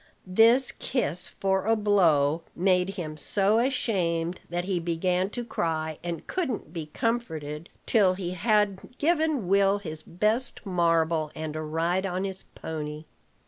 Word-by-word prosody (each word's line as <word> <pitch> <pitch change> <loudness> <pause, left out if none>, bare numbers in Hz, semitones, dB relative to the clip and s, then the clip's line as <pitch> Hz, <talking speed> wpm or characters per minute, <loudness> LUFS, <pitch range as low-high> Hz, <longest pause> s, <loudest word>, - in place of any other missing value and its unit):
This 225 +7 +5
kiss 180 - -2
for 190 +1 -1
a 225 - +4
blow 170 -8 +3
made 185 +1 +2
him 155 -5 -5
so 200 +7 +2
ashamed 185 -10 0
that 175 +1 -2
he 190 -2 0
began 180 +2 0
to 240 +3 -5
cry, 160 -7 -2
and 170 -2 -4
couldn't 260 - -3
be 160 -3 -5
comforted 160 -7 -3 0.2
till 195 -5 +4
he 180 -2 -4
had 210 +3 0
given 310 - +1
Will 195 +1 +4
his 155 -6 -5
best 215 +10 -1
marble 165 -4 +2
and 155 -1 -5
a 155 - -2
ride 165 +5 0
on 185 +1 -2
his 190 -1 -4
pony. 150 -1 -6
185 Hz, 145 wpm, -27 LUFS, 165-210 Hz, 0.2 s, This